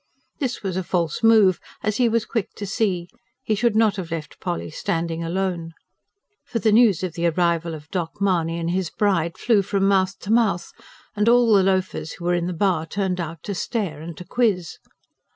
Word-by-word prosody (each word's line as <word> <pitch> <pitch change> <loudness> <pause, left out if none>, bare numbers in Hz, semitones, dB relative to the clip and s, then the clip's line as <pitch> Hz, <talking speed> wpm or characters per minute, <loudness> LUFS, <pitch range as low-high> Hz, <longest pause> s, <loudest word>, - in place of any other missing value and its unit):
This 255 -7 -3
was 190 -2 -2
a 190 - -1
false 170 -3 -1
move, 220 -5 +5 0.2
as 215 0 0
he 245 -2 +3
was 225 -1 +1
quick 225 -5 -3
to 205 - -5
see: 190 -3 -1 0.4
he 220 - 0
should 225 +1 +1
not 220 -2 +3
have 180 -4 -5
left 160 -2 -6
Polly 175 -3 -4
standing 165 +1 -2
alone. 170 -1 -2 0.7
For - - -4
the 225 -1 +2
news 210 -5 +5
of 180 -3 -2
the 170 +1 0
arrival 170 -1 0
of 150 -1 -11
"Doc." 170 -3 -3
Mahony 170 -4 +1
and 170 0 -2
his 185 -2 -1
bride 170 -5 0
flew 225 -4 +3
from 195 0 0
mouth 190 -1 +2
to 205 - -4
mouth, 215 -7 +1 0.4
and 210 +2 +2
all 240 -2 +5
the 200 - +6
loafers 185 -4 0
who 175 - -9
were 175 - +2
in 175 0 0
the - - -2
bar 175 -2 0
turned 190 0 -2
out 165 -2 -5
to 205 - -3
stare 190 - -3
and 165 0 -8
to 180 - -9
quiz. 200 -9 0
185 Hz, 205 wpm, -23 LUFS, 170-210 Hz, 0.7 s, the